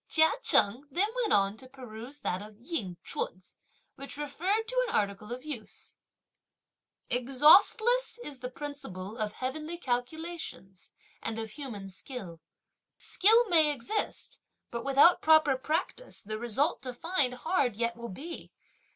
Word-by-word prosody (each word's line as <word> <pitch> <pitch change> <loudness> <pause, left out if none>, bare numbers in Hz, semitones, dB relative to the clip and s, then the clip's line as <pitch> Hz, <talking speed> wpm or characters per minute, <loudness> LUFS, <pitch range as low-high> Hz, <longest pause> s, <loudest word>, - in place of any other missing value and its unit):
Chia 320 0 +5
Cheng 240 - +4
then 365 +9 +1
went 485 -4 0
on 200 +1 +3
to 260 +2 -13
peruse 255 +1 -10
that 180 +2 -2
of 210 0 -12
Ying 235 - -4
Ch'un's, 185 +1 -4 0.4
which 275 +1 -8
referred 370 +9 -1
to - - +1
an - - -2
article 205 +2 -1
of 250 +4 -6
use: 260 -8 -5 1.1
Exhaustless 315 - +4
is 280 -3 -7
the 250 - -5
principle 245 -9 -7
of 210 -1 -1
heavenly 305 +6 -4
calculations 250 - -5 0.3
and 225 - -4
of 225 -1 -4
human 230 -8 -7
skill; 190 -4 -7 0.6
Skill 450 +4 +4
may 320 -4 +6
exist, 290 - -3 0.3
but 235 -1 -4
without 275 +6 +5
proper 315 -3 +5
practice 320 - -3
the 215 +1 -5
result 240 +7 0
to 255 -2 -6
find 285 -4 +1
hard 250 - 0
yet 235 +1 -1
will 235 0 -8
be! 315 - -8
265 Hz, 140 wpm, -29 LUFS, 220-320 Hz, 1.1 s, may